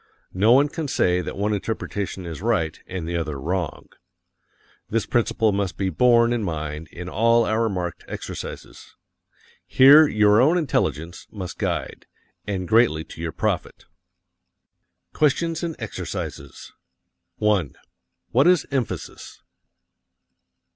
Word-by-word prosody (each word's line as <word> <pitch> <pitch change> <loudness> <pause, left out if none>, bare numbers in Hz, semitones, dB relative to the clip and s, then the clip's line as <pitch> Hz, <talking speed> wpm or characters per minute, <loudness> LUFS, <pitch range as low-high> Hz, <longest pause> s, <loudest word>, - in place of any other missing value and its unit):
No 105 +5 +3
one 140 +3 +5
can 155 +1 -5
say 90 -8 +1
that - - -6
one 105 +2 0
interpretation 100 -2 -4
is 85 0 -7
right 95 -9 0
and 90 -3 -5
the 85 - -3
other 75 -4 -3
wrong. 85 +2 -3 1.0
This 115 0 0
principle 115 -2 +1
must 100 -2 -2
be 95 -1 -1
borne 120 +5 +4
in 120 - -1
mind 80 -4 -4
in 85 +2 -9
all 115 +3 +3
our 110 +1 +1
marked 90 -4 -4
exercises. - - -8 0.7
Here 145 +4 +7
your 105 -2 +4
own 155 +7 +4
intelligence 85 - -2
must 95 -4 -7
guide - - -3 0.4
and 95 -3 -3
greatly 110 -8 +3
to 80 - -11
your 80 -1 -3
profit. - - -3 1.3
QUESTIONS 160 +2 +1
AND 170 -2 -3
EXERCISES. 70 0 -7 0.6
1. 105 - 0 0.6
What 135 +6 +4
is 180 -2 +4
emphasis? 130 -4 -5
105 Hz, 125 wpm, -23 LUFS, 85-120 Hz, 1.3 s, Here